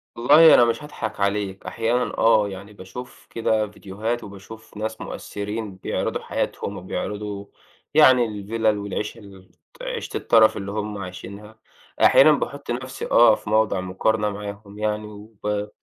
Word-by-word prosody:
والله 150 +7 +7
أنا 120 - +7
مش 120 +5 -1
هاضحَك 145 -9 -6
عليك، 100 -1 -1
أحيانًا 115 +2 -1
آه، 110 -2 +4
يعني 100 +2 -9
باشوف 115 +6 -11
كده 110 -2 0
فيديوهات 105 +3 -4
وباشوف 105 +2 -12
ناس 110 +1 -4
مؤثّرين 105 0 -5
بيعرِضوا 95 - -3
حياتهم - - -3
وبيعرِضوا 105 -1 -5 0.5
يعني 125 -2 +6
الفيلَل 110 0 -1
والعيشة، 105 +2 -4
الت 95 -3 -16 0.2
عيشة - - -4
الترَف 110 -1 +4
اللي 100 0 -5
هُم 105 0 -4
عايشينها 100 +3 -9 0.4
أحيانًا 155 +3 +7
باحُط 140 -2 -2
نَفْسي، 130 +2 -5
آه 115 -2 +7
في - - -9
موضوع 110 -3 +2
مقارنة 105 +4 0
معاهم 100 0 -8
يعني 105 0 -2
وب 105 0 -5
105 Hz, 135 wpm, -23 LUFS, 100-115 Hz, 0.5 s, والله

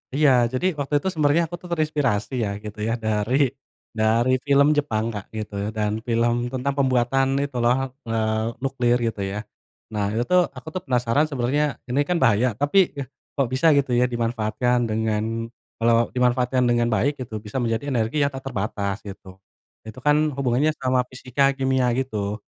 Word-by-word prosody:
Iya, 150 -1 +5 0.2
jadi, 130 - -1
waktu 140 +1 -3
itu - - -1
sebenarnya 155 +1 +3
aku 175 - -3
tuh 180 - -11
terinspirasi 145 -10 0
ya, 105 - -1
gitu 105 0 -8
ya. 115 - 0
Dari 110 +3 0 0.6
dari 115 +3 +3
film 140 0 +5
Jepang, 110 -7 0
Kak, 100 -2 -6
gitu, 110 -1 -5 0.2
dan 105 -1 0 0.2
film 120 0 +2 0.2
tentang 130 +2 -1
pembuatan 130 0 +2 0.2
itu 140 -2 -6
loh, 120 +1 +4 0.3
eee, 110 -1 0 0.2
nuklir, 125 -3 +1
gitu 110 - -4
ya. 100 - -4 0.6
Nah, 105 - -1
itu 120 - +1
tuh, 180 - +6 0.2
aku 130 +4 -11
tuh 185 - -2
penasaran 125 +4 +2
sebenarnya, 140 +1 0 0.3
ini 135 - +1
kan 180 - +1
bahaya, 115 0 +4
tapi, 145 +7 +1 0.2
eh, 135 - -4 0.3
kok 135 -3 +1
bisa, 130 +6 +3
gitu 130 -3 +1
ya, 125 - +4
dimanfaatkan 115 +1 0
dengan 110 0 0 0.5
kalau 115 0 +3 0.2
dimanfaatkan 125 +1 +2
dengan 120 0 +2
baik, 140 +7 +1
gitu, 115 -4 -6
bisa 105 - -5
menjadi 115 +2 -1
energi 125 +5 +1
yang 140 - +1
tak 135 0 -7
terbatas, 100 -4 -2
gitu. 100 -1 -10 0.6
Itu 110 +3 -9
kan 150 0 +5 0.2
hubungannya 140 +2 +1
sama 130 -1 +1
fisika, 130 +2 +1
kimia, 130 -2 +1
gitu. 105 -5 -3
125 Hz, 170 wpm, -23 LUFS, 110-135 Hz, 0.6 s, tuh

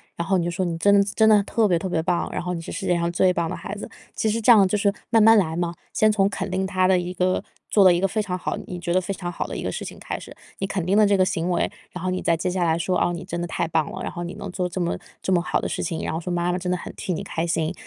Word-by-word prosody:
然 170 - -3
后 190 -1 +3
你 170 - -1
就 - - 0
说：” 175 +2 -2
你 170 -1 -2
真 200 +4 +4
的 200 - +6
真 220 - +4
的 210 -2 +6
特 220 +2 +1
别 175 -3 +3
特 180 - -3
别 165 -2 0
棒， 175 +1 0
然 - - -3
后 180 +1 -3
你 170 - -4
是 - - -8
世 195 - -4
界 175 - +3
上 170 0 0
最 180 +2 +3
棒 170 -2 -1
的 - - -3
孩 200 - -6
子。 205 - -7 0.3
“其 - - 0
实 225 +2 0
这 230 - +6
样 210 -4 +7
就 185 - 0
是 200 0 +2 0.2
慢 225 - +4
慢 225 +1 +7
来 160 -5 +1
嘛， 175 -1 -2 0.2
先 215 - +4
从 195 -2 +3
肯 200 - -4
定 190 +1 -1
他 185 -1 +1
的 190 0 +4
一 180 0 -3
个 185 0 0 0.3
做 205 - +5
了 185 -2 +7
一 175 - +1
个 195 - +2
非 215 +3 -1
常 185 -3 -3
好， - - -3
你 180 - -6
觉 175 0 -2
得 185 - +3
非 195 +2 -3
常 180 -2 -5
好 170 - -4
的 - - -6
一 - - -4
个 - - -2
事 - - -5
情 - - -8
开 - - -4
始， - - -11 0.3
你 195 - -1
肯 195 -2 -2
定 195 +3 +2
了 215 - +6
这 200 -1 +3
个 185 - +4
行 170 -1 -1
为， 175 - +1 0.2
然 180 - -7
后 185 - 0
你 185 0 -2
再 170 - +2
接 165 - -1
下 180 0 0
来 165 -1 +2
说： 180 +2 0
“哦， 175 - +2
你 170 - -5
真 170 - -4
的 175 - -2
太 165 - -2
棒 160 -2 0
了， - - -6
然 - - -3
后 175 - -5
你 175 - -5
能 - - -7
做 180 -1 -1
这 180 - -5
么 170 - -1 0.2
这 - - -2
么 175 - +3
好 175 - 0
的 - - -2
事 - - -3
情， 165 -1 -3
然 - - -2
后 160 - -2
说 180 +1 -5
妈 175 0 0
妈 180 - -1
真 180 0 -3
的 180 - +1
很 - - -8
替 185 - -3
你 175 - -3
开 165 -4 -3
心， 165 0 0
180 Hz, 380 characters per minute, -23 LUFS, 170-195 Hz, 0.3 s, 样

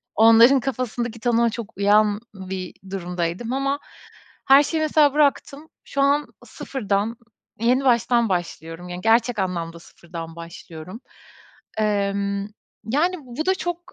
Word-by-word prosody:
onların 230 +5 +7
kafasındaki 240 -3 -3
tanıma 235 0 +2
çok 225 -1 -8
uyan 205 +1 +3 0.2
bir 185 -1 -6 0.2
durumdaydım 180 +4 -3
ama 275 +1 -1 0.7
her 275 +2 +8
şeyi 315 +2 -2
mesela 305 -2 +4
bıraktım. 295 +1 +1 0.2
Şu 280 - -3
an 285 +1 +3 0.2
0'dan 215 -3 -3 0.4
yeni 250 +3 +2
baştan 235 -2 +3
başlıyorum, 175 -1 -4
yani, 180 0 -6
gerçek 230 +2 +2
anlamda 170 -3 -3
sıfırdan 165 -1 -10
başlıyorum. 170 +3 -10 0.8
Emm, 200 -1 0 0.4
yani, 300 - +1
bu 260 +5 -5
da 380 - +3
çok 350 -2 -3
225 Hz, 120 wpm, -23 LUFS, 190-270 Hz, 0.8 s, her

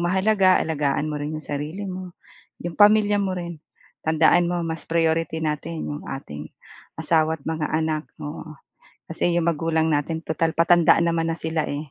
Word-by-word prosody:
mahalaga, 190 +2 +3
alagaan 150 -1 0
mo 150 -1 -4
rin 150 +2 -3
'yong 155 - -8
sarili 150 +7 -4
mo, 185 -2 -7 0.5
'yong 175 -1 -4
pamilya 205 0 +5
mo 190 -2 -1
rin. 170 -3 -6 0.4
Tandaan 160 +2 +4
mo, 175 0 -1
mas 160 0 -5
priority 165 -1 +1
natin 155 +2 -3
'yong 145 0 -5
ating 75 - -7 0.5
asawa 160 -1 +1
at - - -24
mga 160 -2 -2
anak, 155 -1 -1 0.2
oo. 155 +1 -8 0.5
Kasi 170 +1 0
'yong 170 -1 +1
magulang 160 0 +1
natin 155 +2 -1
tutal 160 0 -1
patanda 170 0 +5
naman 165 -1 +1
na - - 0
sila, 160 -1 -2
eh. 145 0 -5
160 Hz, 165 wpm, -23 LUFS, 155-175 Hz, 0.5 s, pamilya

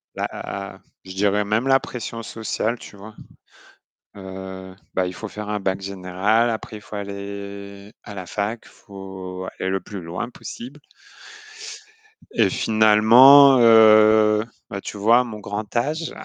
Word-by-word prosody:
bah - - -2
a 100 -1 -7
a 95 - -21 0.2
je 95 0 -10
dirais 105 +1 +1
même 110 +5 -1
la 135 0 +4
pression 115 -2 -7
sociale, 110 +2 -3
tu 105 - -13
vois? 105 +2 -12 1.0
Heu, 95 -1 -9 0.2
bah, 90 -1 0
il 90 - -6
faut 110 - -7
faire 105 0 -8
un 105 -1 -2
Bac 95 0 -2
général, 100 +4 0
après 110 0 -6
il 105 - -14
faut 105 - -11
aller 100 0 -8
à 105 - -10
la 95 -3 -8
fac, 105 +4 -3
il - - -17
faut 95 -2 -9
aller 95 - -2
le 95 - -1
plus 100 0 -9
loin 85 +7 -5
possible. 130 +3 -10 1.5
Et - - +2
finalement, 115 +6 +6
heu 110 -1 +6 0.3
bah, 100 0 -6
tu - - -8
vois, 115 +4 +4
à - - +1
mon 110 -3 -8
grand 105 +1 -6
âge 155 +7 -2
105 Hz, 160 wpm, -21 LUFS, 95-110 Hz, 1.5 s, finalement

